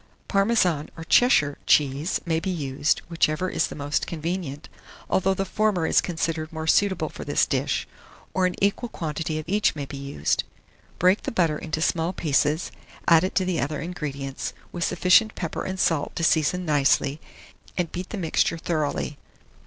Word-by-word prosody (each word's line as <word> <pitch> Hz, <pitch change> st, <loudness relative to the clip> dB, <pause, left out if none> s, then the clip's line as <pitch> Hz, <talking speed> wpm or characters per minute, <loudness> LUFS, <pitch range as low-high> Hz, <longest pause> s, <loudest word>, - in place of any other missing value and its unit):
Parmesan 195 Hz, -7 st, +2 dB
or 165 Hz, -, -6 dB
Cheshire 160 Hz, -, +4 dB
cheese 145 Hz, +3 st, +2 dB
may 165 Hz, -2 st, +1 dB
be 190 Hz, -, -3 dB
used, 145 Hz, -4 st, 0 dB
whichever 165 Hz, +1 st, +1 dB
is -, -, +1 dB
the -, -, -8 dB
most 145 Hz, -1 st, -1 dB
convenient, 165 Hz, -3 st, -4 dB, 0.4 s
although 190 Hz, +1 st, +2 dB
the 195 Hz, -, -1 dB
former 200 Hz, -3 st, +1 dB
is -, -, +4 dB
considered 160 Hz, -2 st, -2 dB
more 160 Hz, -1 st, -5 dB
suitable 190 Hz, +4 st, +2 dB
for -, -, -8 dB
this -, -, +2 dB
dish; -, -, -1 dB, 0.5 s
or 185 Hz, -1 st, +3 dB
an 180 Hz, -, -3 dB
equal 205 Hz, +4 st, +1 dB
quantity 160 Hz, -3 st, -3 dB
of 155 Hz, -, -5 dB
each 205 Hz, +1 st, +2 dB
may 145 Hz, -2 st, -4 dB
be 140 Hz, -, -8 dB
used. 140 Hz, -, -1 dB, 0.5 s
Break 185 Hz, +3 st, +3 dB
the -, -, -4 dB
butter 165 Hz, -8 st, +1 dB
into 155 Hz, 0 st, -2 dB
small 170 Hz, +1 st, 0 dB
pieces, 150 Hz, 0 st, +1 dB, 0.4 s
add 165 Hz, 0 st, +6 dB
it 185 Hz, -, -2 dB
to 185 Hz, -, +2 dB
the 180 Hz, -3 st, 0 dB
other 145 Hz, +2 st, -2 dB
ingredients, 140 Hz, -5 st, -5 dB, 0.2 s
with 175 Hz, -, -3 dB
sufficient 215 Hz, +6 st, +4 dB
pepper 165 Hz, -4 st, -4 dB
and 190 Hz, 0 st, -4 dB
salt 160 Hz, -5 st, +1 dB
to 165 Hz, -, -2 dB
season 160 Hz, +3 st, +2 dB
nicely, 145 Hz, -1 st, +2 dB, 0.6 s
and 175 Hz, -3 st, -1 dB
beat 180 Hz, +1 st, -5 dB
the 215 Hz, -, -5 dB
mixture 165 Hz, -1 st, +1 dB
thoroughly. 155 Hz, -3 st, -2 dB
165 Hz, 170 wpm, -25 LUFS, 150-185 Hz, 0.6 s, add